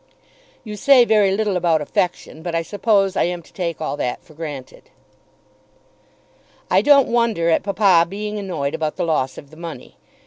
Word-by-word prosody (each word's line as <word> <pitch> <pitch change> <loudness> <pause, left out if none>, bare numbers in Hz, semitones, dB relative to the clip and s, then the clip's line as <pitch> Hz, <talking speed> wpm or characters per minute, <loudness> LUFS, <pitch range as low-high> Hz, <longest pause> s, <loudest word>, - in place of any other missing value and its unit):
You 210 -3 -7
say 255 +2 +5
very 215 -3 +3
little 200 0 0
about 170 -3 +2
affection, 160 +1 -3
but 170 0 -4
I 165 - 0
suppose 200 0 +1
I - - +2
am 175 0 -4
to - - -22
take 170 -3 -4
all 155 - -3
that 125 - -3
for 160 - -18
granted. 150 -5 -9 1.8
I 185 - +5
don't 280 +2 +5
wonder 230 -8 +1
at - - +2
papa 195 -4 +3
being 210 +2 -5
annoyed 160 -8 -3
about 160 -1 -2
the - - -2
loss 150 -5 -1
of 140 - -12
the 155 - -15
money. 165 -2 -9
180 Hz, 175 wpm, -20 LUFS, 160-210 Hz, 1.8 s, say